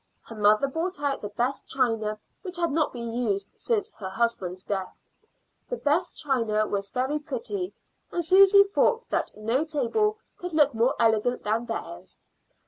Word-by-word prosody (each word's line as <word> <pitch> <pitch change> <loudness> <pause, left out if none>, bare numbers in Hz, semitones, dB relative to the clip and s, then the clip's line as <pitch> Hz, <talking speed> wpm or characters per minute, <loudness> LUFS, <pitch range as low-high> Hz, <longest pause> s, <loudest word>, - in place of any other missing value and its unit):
Her - - -11
mother 215 +5 +4
brought 325 +5 -3
out 285 -1 -1
the 205 - -5
best 245 +6 -2
china, 225 -5 0 0.2
which 370 -3 -4
had 340 -2 0
not 310 +1 +2
been 235 -2 -5
used 205 -5 -1
since 435 -3 -1
her 190 -3 -4
husband's 190 -4 -1
death. 190 -2 -3 0.8
The - - -2
best - - 0
china 230 -7 +1
was 200 -1 -3
very 265 +6 -1
pretty, 400 +2 -4 0.4
and 345 -1 -1
Susy 390 +3 +8
thought 450 +4 +1
that - - 0
no 230 +7 +1
table 320 - 0 0.2
could 355 -1 -6
look 295 -3 +4
more 235 +4 +2
elegant 230 +2 +2
than 225 +3 -1
theirs. - - -6
260 Hz, 160 wpm, -26 LUFS, 215-345 Hz, 0.8 s, Susy